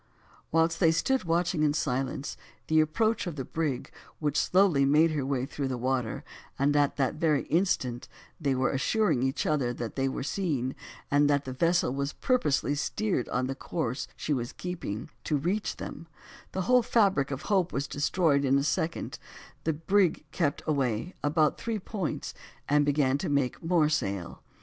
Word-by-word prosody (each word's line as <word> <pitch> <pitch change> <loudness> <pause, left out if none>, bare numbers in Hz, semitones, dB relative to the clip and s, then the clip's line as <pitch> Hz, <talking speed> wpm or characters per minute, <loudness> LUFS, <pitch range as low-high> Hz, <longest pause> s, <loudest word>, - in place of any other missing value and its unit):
Whilst 165 +1 +2
they 165 -4 +5
stood 255 +9 +1
watching 170 0 +1
in 150 -1 +2
silence 135 -1 -2 0.3
the 160 0 +3
approach 215 +7 +1
of 170 - -4
the 135 -3 -4
brig, 150 -5 -2 0.3
which 150 -2 -1
slowly 180 -5 +4
made 155 +4 +4
her 150 -3 -1
way 130 -1 -1
through 140 0 -3
the 130 -1 -2
water, 125 -2 -1 0.3
and 145 +2 +2
at 145 -1 +3
the 135 -2 +2
very 155 -2 +1
instant 130 -9 +1 0.3
that - - -15
they 135 - +2
were 130 +1 +1
assuring 140 - +1
each 130 +1 0
other 135 -5 +1
that 115 -2 -5
they 135 0 +1
were 130 - -4
seen, 140 -6 -1 0.4
and 145 0 +4
that 145 -1 +2
the 130 - -4
vessel 165 -2 +2
was 140 +1 -2
purposely 150 - +1
steered 165 - -1
on 125 +1 0
the 135 - -2
course 135 -2 -3
she 150 - -1
was 120 -3 -3
keeping, 175 - -5
to 150 - +1
reach 185 +9 -1
them, 165 - -8 0.4
the 190 - -2
whole 250 +5 +5
fabric 200 - +2
of 135 -2 -4
hope 190 -4 +1
was 140 - -1
destroyed 145 0 +1
in 135 0 +3
a 140 - +1
second; 160 +2 -2 0.5
the 160 - +2
brig 175 +1 +1
kept 145 -3 -1
away 140 - 0
about 150 +1 +2
three 230 -1 -2
points, 195 -3 -4 0.3
and 145 0 +3
began 140 -2 +2
to - - -2
make 140 -3 0
more 165 -2 +3
sail. 100 - -2
145 Hz, 180 wpm, -28 LUFS, 135-170 Hz, 0.5 s, they